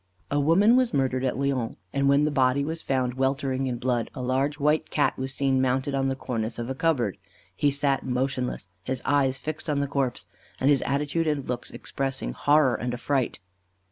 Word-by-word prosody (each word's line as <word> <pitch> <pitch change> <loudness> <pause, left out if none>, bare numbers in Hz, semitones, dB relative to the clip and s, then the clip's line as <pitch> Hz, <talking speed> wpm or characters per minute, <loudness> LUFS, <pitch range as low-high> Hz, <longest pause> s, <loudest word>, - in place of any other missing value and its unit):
A 145 - +2
woman 185 - +5
was 255 - +2
murdered 130 -1 +1
at 130 - 0
Lyons, 135 -4 -1 0.2
and 140 0 +2
when 140 +2 +4
the 150 - 0
body 135 0 +2
was 160 +2 -4
found 130 -2 0
weltering 135 0 0
in 125 -2 -2
blood, 120 -2 -1
a - - -5
large 135 +3 0
white 150 +2 +1
Cat 145 - +1
was 130 0 -4
seen 135 -1 +1
mounted 130 +2 0
on 135 0 +1
the 135 - 0
cornice 115 -4 -3
of 120 +2 -4
a - - 0
cupboard. 135 - 0 0.4
He 145 - +2
sat 140 -1 0
motionless, 125 -4 -2 0.2
his 130 -1 -3
eyes 135 -2 +2
fixed 155 +3 -5
on 145 -2 +1
the 140 - +1
corpse, 135 -3 -2 0.3
and 135 +3 +4
his 140 - +3
attitude 150 +4 0
and 145 -3 0
looks 125 -1 -4
expressing 135 -1 -3
horror 145 -3 +3
and 120 +2 -2
affright. 130 0 -1
135 Hz, 200 wpm, -26 LUFS, 130-145 Hz, 0.4 s, woman